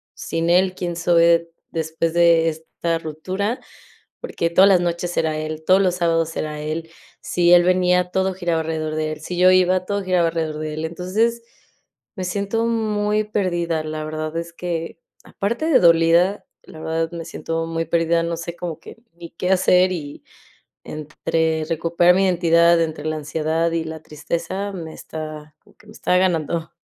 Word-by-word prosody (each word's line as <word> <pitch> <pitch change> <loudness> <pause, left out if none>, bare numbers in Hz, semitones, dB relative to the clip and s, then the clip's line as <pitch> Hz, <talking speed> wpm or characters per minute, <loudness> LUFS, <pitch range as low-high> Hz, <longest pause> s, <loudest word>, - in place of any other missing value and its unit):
sin 165 +1 -2
él, 185 +1 +3
quién 175 -2 -4
soy 170 0 +3
de 170 0 +3 0.2
después 160 0 -2
de 170 -1 +4
esta 165 +1 -3
ruptura, 185 - -3 0.6
porque 175 - -2
todas 190 +3 +6
las 180 -2 +5
noches 175 0 -2
era 155 -1 0
él, 155 0 -5
todos 190 +1 +5
los 180 -1 +1
sábados 165 -2 0
era 150 -1 -3
él. 160 +2 -4 0.3
Si 175 0 +2
él 175 0 +8
venía, 180 0 +2
todo 190 0 0
giraba 175 -3 -1
alrededor 155 -1 -3
de 155 0 -1
él. 155 - -8
Si 180 +2 -5
yo 185 0 +6
iba, 185 0 +3
todo 200 -1 -1
giraba 180 -3 +2
alrededor 160 -2 -3
de 155 -1 -4
él. 155 +1 -4
Entonces, 215 +8 -1 0.7
me 185 - -4
siento 200 +5 -1
muy 215 -2 0
perdida, 175 -6 -1
la 155 0 -4
verdad 155 0 -4
es 170 0 -6
que, 165 -2 -4 0.3
aparte 235 +10 -3
de 300 - +5
dolida, 170 +3 +4 0.2
la 155 - -12
verdad 160 +1 -2
me 165 -1 -6
siento 165 0 -4
muy 165 0 -2
perdida, 165 0 +1
no 170 0 -2
sé 170 +1 -6
como 165 -2 -6
que - - -12 0.2
ni 170 -1 -11
qué 180 +2 -3
hacer, 185 0 +4
y 145 -5 -7 0.6
entre 160 +1 -2
recuperar 170 +2 +3
mi 195 - +3
identidad, 170 -1 +4
entre 155 -2 -3
la 155 0 -1
ansiedad 160 +2 -1
y 165 -1 -1
la 160 -1 -7
tristeza, 170 +6 -4
me 165 -3 -7
está 155 -1 -8
como - - -24
que 210 - -22
me 215 - -13
está 180 -4 +1
ganando. 165 -2 0
170 Hz, 175 wpm, -21 LUFS, 160-180 Hz, 0.7 s, él